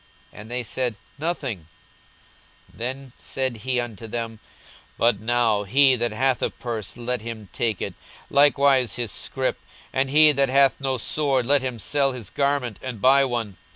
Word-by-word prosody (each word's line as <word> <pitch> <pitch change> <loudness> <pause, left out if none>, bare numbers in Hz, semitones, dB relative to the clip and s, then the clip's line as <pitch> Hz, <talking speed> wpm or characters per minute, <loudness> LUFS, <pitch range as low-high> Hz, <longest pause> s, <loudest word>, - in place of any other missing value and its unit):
And 105 +1 -11
they 125 +1 -2
said, 120 0 -2 0.2
Nothing. 135 - -3 1.1
42:022:036 - - -19
Then 130 +2 -4
said 130 -3 -2
he 125 +3 -1
unto 115 -2 -6
them, 115 -1 -5 0.6
But 115 -3 +2
now, 115 -1 +1
he 130 +6 +5
that 120 -1 -1
hath 130 +3 +1
a - - +1
purse, 110 -4 -6
let 120 0 -2
him 110 -3 -8
take 115 -5 -1
it, - - -4
and - - -30 0.4
likewise 140 -4 +4
his 120 -4 -2
scrip: - - -3 0.3
and 135 0 +1
he 150 +2 +7
that 140 -2 +1
hath 135 +1 +4
no 135 -1 0
sword, 135 +1 0
let 140 +2 +4
him 130 -2 -3
sell 135 +4 +1
his 115 -7 -8
garment, 140 -6 -1
and 125 -4 -6
buy 135 +4 +5
one. 115 -7 -3
125 Hz, 170 wpm, -23 LUFS, 115-135 Hz, 1.1 s, he